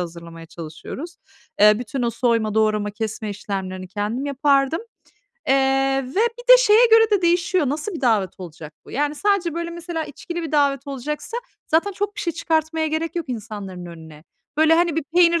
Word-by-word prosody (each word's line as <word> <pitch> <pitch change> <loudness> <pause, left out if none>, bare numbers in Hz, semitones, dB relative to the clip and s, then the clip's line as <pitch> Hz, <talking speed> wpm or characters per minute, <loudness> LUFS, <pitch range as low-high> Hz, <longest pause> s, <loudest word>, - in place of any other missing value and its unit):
hazırlamaya 170 -1 -8
çalışıyoruz, 170 - -8 0.4
eee, 210 +1 +7
bütün 245 +2 -4
o 235 - +1
soyma, 230 -3 0
doğrama, 215 -1 +1
kesme 215 0 -4
işlemlerini 190 -2 -5
kendim 215 +7 -3
yapardım, 280 +3 +2 0.7
eee, 270 - +5 0.5
ve - - -9
bir 470 +3 0
de - - +11
şeye 475 0 +6
göre 450 -1 +6
de 400 -3 +2
değişiyor, 345 -2 +2
nasıl 310 +8 -3
bir - - -5
davet 215 -8 +1
olacak 155 -3 -9
bu? - - -14
Yani 290 +2 -1
sadece 360 -2 +1
böyle 340 0 -3
mesela 335 -1 -4
içkili 345 +4 -6
bir 315 -2 -5
davet 280 -1 +2
olacaksa 295 - -5 0.3
zaten 335 +6 +2
çok 410 +2 -3
bir - - -4
şey 340 -4 -1
çıkartmaya 320 -1 0
gerek 320 +2 -2
yok 335 -4 -3
insanların 205 -6 -6
önüne. 160 -2 -12 0.3
Böyle, 315 +1 +5
hani, 340 -2 +2
bir 325 - -1
peynir 340 -1 +5
280 Hz, 175 wpm, -22 LUFS, 210-340 Hz, 0.7 s, de